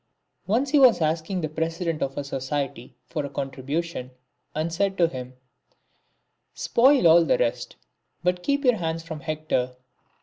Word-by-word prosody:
" - - -52
Once 250 +7 +1
he 295 - +5
was 255 -4 +6
asking 160 +3 -1
the 155 - -1
president 165 +1 -2
of 135 0 -2
a 145 - -1
society 135 -2 -4
for 145 - -3
a 140 - -4
contribution, 135 +1 -4 0.5
and 160 +2 -2
said 195 +2 0
to 170 - +4
him: 130 -4 -7 0.4
—. - - -44
" - - -49
Spoil 260 -3 +4
all 165 +1 +7
the 155 - +2
rest, 120 -1 -1 0.5
but 180 0 +1
keep 280 +5 0
your 245 -3 +4
hands 165 -2 -3
from 160 -2 -7
Hector." 150 -5 -2
160 Hz, 170 wpm, -25 LUFS, 140-180 Hz, 0.5 s, all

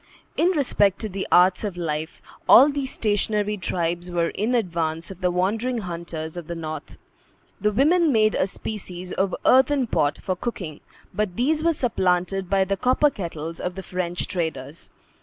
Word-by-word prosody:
In 340 - +3
respect 210 - +2
to 215 - -3
the 195 0 -4
arts 180 +2 +5
of 200 -4 -3
life, 160 -2 -4 0.3
all 275 +4 +9
these 280 -2 -2
stationary 210 0 0
tribes 175 -2 -2
were 170 -1 0
in 225 +5 -1
advance 170 -6 -1
of 190 - -11
the 180 - +2
wandering 215 +8 0
hunters 170 -5 -5
of 175 -3 -7
the 170 - -4
North. 155 -2 -7 0.6
The 210 - +1
women 310 - +3
made 215 -3 +3
a 185 - +1
species 185 -3 -6
of 190 -1 0
earthen 265 +1 +4
pot 145 -9 0
for 185 - -3
cooking, 180 -7 -5 0.3
but 210 -4 -1
these 305 - +1
were 335 - +4
supplanted 190 - 0
by 195 -1 +3
the 195 +1 -1
copper 260 +6 +3
kettles 165 - -6
of 180 0 -3
the 190 - -6
French 180 -1 -3
traders. 160 -4 -4
190 Hz, 170 wpm, -24 LUFS, 170-225 Hz, 0.6 s, all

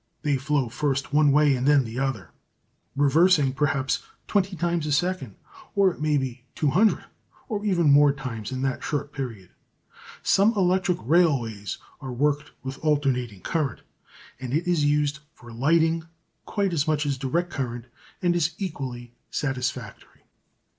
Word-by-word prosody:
They 145 -2 +2
flow 140 -1 0
first 135 +3 -2
one 150 -1 +5
way 145 -1 +4
and 130 +2 -1
then 145 -2 +5
the 115 +3 -5
other, 130 - -2 0.6
reversing 145 0 +4
perhaps 140 -2 0 0.2
twenty 195 -2 0
times 170 -1 -1
a - - -1
second, 170 - -1 0.4
or 195 -2 +4
it 170 - -11
may 150 -1 +2
be 130 -2 -4
two 150 -3 +1
hundred, 215 +7 +3 0.4
or 210 -4 -3
even 175 -7 +3
more 145 0 +6
times 125 -6 -6
in 130 0 -3
that 135 -1 -2
short 145 -1 -3
period. 115 -10 -6 0.7
Some 205 +4 +4
electric 185 -2 +2
railways 120 - +1 0.2
are 135 -3 -6
worked 145 +4 0
with 130 0 -6
alternating 130 -9 0
current, 145 - -2 0.6
and 130 +1 -3
it 170 +3 -1
is 170 -4 +2
used 145 0 +1 0.2
for 120 -1 -13
lighting 160 +6 +2 0.4
quite 200 -3 0
as 155 -2 0
much 155 -1 +1
as 140 -2 -1
direct 170 +7 -1
current 120 -4 -4 0.4
and 175 -1 +3
is 165 -1 0
equally 130 - -5 0.2
satisfactory. 125 -5 -4
145 Hz, 155 wpm, -25 LUFS, 130-165 Hz, 0.7 s, more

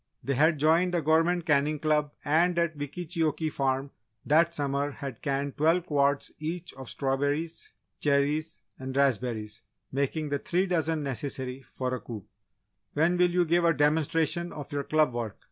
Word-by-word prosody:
They 140 - 0
had 155 +4 +3
joined 165 +5 +3
a 170 - +1
Government 165 +2 +2
Canning 150 +1 +2
Club 150 -1 +1
and 170 +4 +3
at 170 -2 +1
Wickeecheokee 155 +1 -2
Farm 135 0 -1 0.3
that 165 +3 +4
summer 145 -2 -1
had 135 -5 -7
canned 140 0 -2
twelve 165 +3 +3
quarts 140 -3 +1
each 165 +2 -5
of 130 -2 -9
strawberries, 145 +4 -2 0.3
cherries 150 +2 +1 0.2
and 130 0 -5
raspberries, 120 -5 0 0.3
making 140 +3 -1
the 145 0 -1
three 180 +6 0
dozen 160 -4 0
necessary 130 0 -4
for 130 -1 -4
a 130 - -2
coup. 110 -5 -8 0.7
"When 160 +4 +2
will 180 0 +4
you 175 0 +2
give 170 +2 +2
a 165 -1 +4
demonstration 160 +3 +1
of 145 -2 -8
your 145 -1 -2
club 155 -4 +2
work? 115 -4 -4
150 Hz, 160 wpm, -28 LUFS, 140-165 Hz, 0.7 s, that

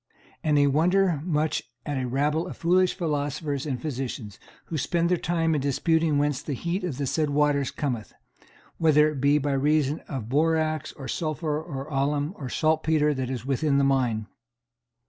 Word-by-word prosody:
And 150 -2 +2
I 145 - +5
wonder 170 +3 +2
much 155 -2 0 0.2
at 145 -3 -2
a 125 - -2
rabble 150 +6 0
of - - -8
foolish 180 +2 +3
philosophers 145 -3 -2
and 130 -4 -2
physicians, 125 -7 -5 0.3
who 160 - -4
spend 170 +5 +1
their 180 - +3
time 165 -1 0
in 150 - 0
disputing 160 +2 +1
whence 145 -2 +1
the 145 - -4
heat 175 - -2
of 165 -8 -3
the 140 - -1
said 145 +3 0
waters 145 -1 +2
cometh, 125 -7 -3 0.7
whether 155 -2 +5
it 140 -4 -5
be 140 +1 +4
by 145 -1 0
reason 145 +1 +2
of 130 -6 -5
borax, 155 +2 +1
or 135 -3 -8
sulphur, 155 -1 -2
or 140 -5 -6
alum, 145 +2 0
or 135 -4 -6
saltpetre, 155 -1 +2
that 130 -2 -3
is 125 -2 -4
within 140 +1 +1
the 140 - +3
mine. 125 -5 +1
150 Hz, 175 wpm, -26 LUFS, 135-160 Hz, 0.7 s, I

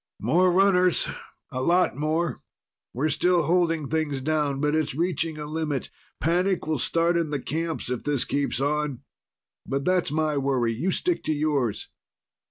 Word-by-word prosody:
"More 180 - +3
runners. 185 -1 +4 0.4
A 130 - -3
lot 175 +3 +3
more. 155 +4 -1 0.5
We're 145 +6 -1
still 175 +3 +2
holding 165 -2 +1
things 155 -3 -1
down, 145 -1 0
but 150 +1 +1
it's 155 -4 0
reaching 165 -1 -1
a 150 - -5
limit. 155 -2 -3 0.3
Panic 180 +3 +1
will 155 -3 -1
start 170 +6 +1
in 165 -2 0
the 145 -1 -2
camps 160 +4 -3
if 125 - -3
this 140 -5 0
keeps 140 0 -1
on. 145 -2 -1 0.6
But 135 +1 -3
that's 180 -2 +2
my 155 0 0
worry. 130 -4 +1
You 140 +12 -1
stick 350 - 0
to 155 - +1
yours." 145 -7 -1
155 Hz, 160 wpm, -25 LUFS, 140-170 Hz, 0.6 s, runners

